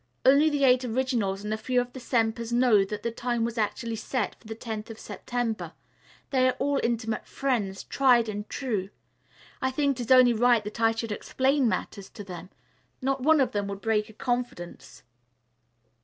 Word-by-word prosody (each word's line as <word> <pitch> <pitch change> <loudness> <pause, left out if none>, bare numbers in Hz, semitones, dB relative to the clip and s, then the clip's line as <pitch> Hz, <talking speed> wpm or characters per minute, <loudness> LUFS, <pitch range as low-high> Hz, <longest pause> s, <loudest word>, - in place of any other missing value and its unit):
Only 280 +4 +6
the 290 -2 0
Eight 255 -1 +5
Originals 235 -5 -1
and 210 +1 -2
a - - -1
few 250 +3 0
of 245 0 -3
the 260 - -7
'Sempers' 230 -2 -1
know 240 -4 +4
that 205 +2 -6
the 235 - -1
time 240 0 -1
was 235 0 -3
actually 220 +2 -2
set 255 +3 -2
for 225 - -19
the 220 - -6
tenth 220 -1 -6
of 225 - -8
September. 240 -2 -4 0.6
They 255 -2 +3
are 255 - +2
all 285 +1 +1
intimate 225 -2 -2
friends, 220 -8 -2
tried 245 -4 +3
and 210 0 -5
true. 210 -8 -2 0.7
I 260 - +1
think 275 -1 0
it 240 - -2
is 225 - -4
only 255 -2 +7
right 235 -1 +3
that 210 +2 -7
I 225 0 +5
should 225 -1 -4
explain 265 +4 +1
matters 195 +1 -4
to 205 - -9
them. 180 -2 -9 0.5
Not 270 0 -1
one 310 +3 +4
of 265 - +2
them 205 -1 -2
would 200 0 -6
break 220 -2 0
a - - -13
confidence. 240 -7 -4
235 Hz, 190 wpm, -27 LUFS, 215-255 Hz, 0.7 s, only